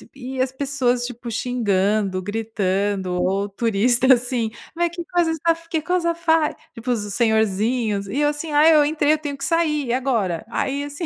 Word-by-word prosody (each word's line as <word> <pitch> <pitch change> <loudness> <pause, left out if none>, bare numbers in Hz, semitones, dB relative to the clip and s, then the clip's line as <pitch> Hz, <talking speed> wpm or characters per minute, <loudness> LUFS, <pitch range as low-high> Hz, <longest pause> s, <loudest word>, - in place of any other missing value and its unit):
e 260 0 -7
as 260 0 0
pessoas, 260 -3 0
tipo, 240 -1 -7
xingando, 205 -5 0
gritando 200 -2 -2
ou 195 +3 0
turista, 235 +5 +3
assim, 240 -2 -1 0.2
"mas 345 0 +1
que 345 - -4
cosa 350 -3 +1
estaf 330 +1 -1
che 320 -2 0
cosa 345 0 0
fai?". 320 -2 +2 0.2
Tipo 240 +2 -4
os 235 - +1
senhorzinhos 220 -1 +1
e 265 +9 -3
eu 295 - +3
assim: 295 +1 -4
"Ai, 310 +2 +6
eu 300 - +6
entrei 300 0 +2
eu - - +1
tenho 290 -2 -5
que 275 - -4
sair 305 -5 +1
e 235 - 0
agora?". 225 -9 -1
Aí 280 +3 -1
assim, 290 +4 -5
250 Hz, 180 wpm, -21 LUFS, 215-300 Hz, 0.2 s, Ai